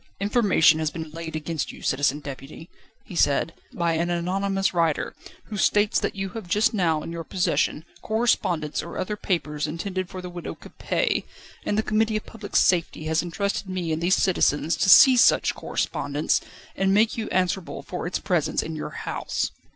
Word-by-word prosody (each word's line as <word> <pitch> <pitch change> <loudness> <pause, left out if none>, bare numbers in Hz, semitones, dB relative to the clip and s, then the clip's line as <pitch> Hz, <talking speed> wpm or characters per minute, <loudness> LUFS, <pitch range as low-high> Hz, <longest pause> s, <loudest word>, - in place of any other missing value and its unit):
"Information 200 -7 +4
has 155 -1 0
been 160 -1 -7
laid 160 0 -6
against 155 -1 -3
you, - - -13
Citizen 145 +2 +1
Deputy," 140 +4 -9 0.3
he 180 - -10
said, 155 +1 +2 0.2
"by 170 -1 0
an 170 +2 0
anonymous 195 +3 0
writer, 165 -3 0 0.4
who 210 - -4
states 205 +1 +3
that - - -2
you 195 -1 -3
have 215 -1 -8
just 215 +6 +2
now 165 -7 +1
in - - -6
your 170 0 -5
possession 170 -2 0 0.2
correspondence 180 -9 0
or - - -8
other 210 +3 -2
papers 155 -7 -2
intended 185 +3 -4
for 185 - -7
the 180 - -6
Widow 175 -1 -7
Capet: - - -2 0.4
and 205 - +1
the 220 - +2
Committee 215 0 +1
of 215 - -6
Public 215 -3 -9
Safety 170 -3 +2
has 160 +1 +1
entrusted 195 +3 -3
me 180 -3 -2
and 155 +1 -1
these 180 +2 +3
citizens 165 -3 +2
to - - +2
seize 255 +4 +9
such - - +4
correspondence, 145 +2 -1 0.3
and 195 +1 +2
make 220 +2 +3
you 225 - -4
answerable 185 -1 -1
for 180 -2 -5
its 180 - -1
presence 175 -6 0
in 160 - -5
your 155 - -5 0.2
house." - - -2
175 Hz, 180 wpm, -25 LUFS, 160-200 Hz, 0.4 s, seize